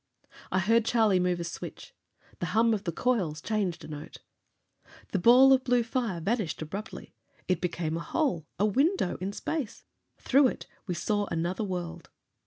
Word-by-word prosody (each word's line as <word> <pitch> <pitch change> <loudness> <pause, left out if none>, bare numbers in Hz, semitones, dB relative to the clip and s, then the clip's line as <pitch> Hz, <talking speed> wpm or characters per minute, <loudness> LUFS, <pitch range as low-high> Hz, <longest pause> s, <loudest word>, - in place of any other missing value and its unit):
I 185 - +1
heard 225 +5 +3
Charlie 220 -5 +3
move 180 -1 +1
a - - -2
switch. 165 - -8 0.5
The 175 - -2
hum 230 0 +5
of 205 - -3
the 170 - 0
coils 180 -7 0
changed 200 -1 -2
a - - -9
note. 150 -1 -8 0.9
The 195 - 0
ball 255 +7 +7
of 260 -1 +3
blue 245 -2 +2
fire 230 -6 -2
vanished 200 -1 -1
abruptly. 195 +7 -7 0.3
It 185 - 0
became 170 -3 -2
a - - -3
hole, 175 - -1
a 200 - +2
window 275 - +1
in 190 +2 -3
space! 275 +3 -4 0.3
Through 275 +1 +4
it, - - -5 0.2
we 180 - -2
saw 205 +4 0
another 175 +5 -2
world! 175 -4 -5
200 Hz, 170 wpm, -28 LUFS, 175-235 Hz, 0.9 s, ball